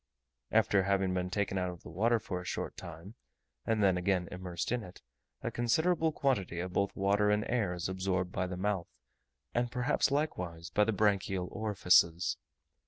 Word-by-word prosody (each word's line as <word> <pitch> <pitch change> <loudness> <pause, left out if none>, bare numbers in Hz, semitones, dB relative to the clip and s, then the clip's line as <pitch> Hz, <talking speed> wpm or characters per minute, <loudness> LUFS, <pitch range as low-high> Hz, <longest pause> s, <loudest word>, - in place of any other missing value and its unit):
After 100 - +4
having 95 -1 +1
been 90 0 -1
taken 100 0 -1
out 90 0 -1
of 90 -2 -10
water 110 +9 +2
for 90 -4 -4
a - - -9
short 90 - -4
time, 85 +4 -9 0.5
and 110 -2 +2
then 95 -2 +4
again 90 -1 +1
immersed 90 0 -4
in 125 -1 0
it, 90 -4 -12 0.4
a - - -2
considerable 160 +7 +2
quantity 100 - 0
both 95 +2 0
of - - -28
water 100 +1 +3
and 105 0 +2
air 115 -7 +1
is 85 - -3
absorbed 95 -1 -1
by 90 0 -1
the 90 0 -5
mouth, 95 -2 -1 0.7
and 120 0 0
perhaps 125 +5 +1
likewise 90 - -2
by 105 - +3
the 115 - +1
branchial 100 -3 +1
orifices. 90 -6 +3
95 Hz, 170 wpm, -32 LUFS, 90-110 Hz, 0.7 s, After